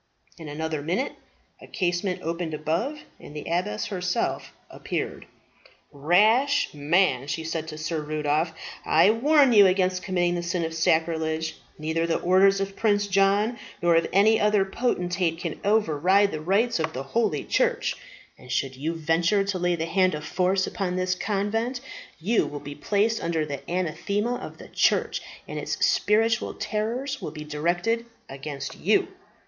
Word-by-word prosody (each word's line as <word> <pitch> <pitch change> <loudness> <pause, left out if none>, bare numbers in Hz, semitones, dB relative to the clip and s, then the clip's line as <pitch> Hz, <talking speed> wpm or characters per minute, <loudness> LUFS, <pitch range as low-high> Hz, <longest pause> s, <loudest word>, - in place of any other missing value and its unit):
In 160 -2 -8
another 155 0 -3
minute 180 - -1 0.5
a - - -12
casement 180 -1 -1
opened 165 -1 -3
above, 170 - -2 0.2
and 150 - -12
the 150 - -4
abbess 195 +6 -1
herself 180 -3 -2 0.2
appeared. - - -5 0.6
"Rash 215 - +3
man," 145 -2 +2
she 145 +3 -3
said 160 0 -3
to 155 - -7
Sir 155 0 -3
Rudolph, 150 +2 0 0.3
"I 165 +6 +5
warn 275 +3 +4
you 205 -3 +8
against 185 0 +1
committing 175 -2 0
the 175 - -2
sin 170 0 -1
of 160 - -4
sacrilege. 160 0 0 0.2
Neither 160 +2 -1
the 165 - +1
orders 195 +2 +4
of 195 0 -3
Prince 205 -2 +2
John 200 +4 +2 0.2
nor 170 -1 +3
of 165 - +3
any 215 +3 +4
other 210 -2 +3
potentate 180 -6 -1
can 165 -2 -5
over 205 -6 +2
ride 195 +5 +4
the 155 - -4
rights 205 +6 +1
of 160 0 -2
the 130 - -4
holy 225 +12 0
church; - - 0 0.4
and - - -11
should 135 -1 -1
you 155 +5 -3
venture 165 +5 +2
to 195 -2 -2
lay 175 0 +1
the 165 -1 -2
hand 185 0 +2
of 150 0 -6
force 185 +2 +1
upon 180 -2 -3
this 185 0 0
convent 215 +6 -1 0.4
you 210 +8 +1
will 145 - -6
be 145 0 -8
placed 210 +9 0
under 165 -2 0
the 140 -2 -5
anathema 190 +6 -1
of - - -9
the - - -12
church, - - +1 0.3
and - - -5
its - - -3
spiritual 220 +2 +2
terrors 230 +6 -3
will - - -4
be 150 0 -8
directed 175 +10 -1 0.2
against 140 0 -6
you." - - +2
180 Hz, 165 wpm, -25 LUFS, 160-210 Hz, 0.6 s, you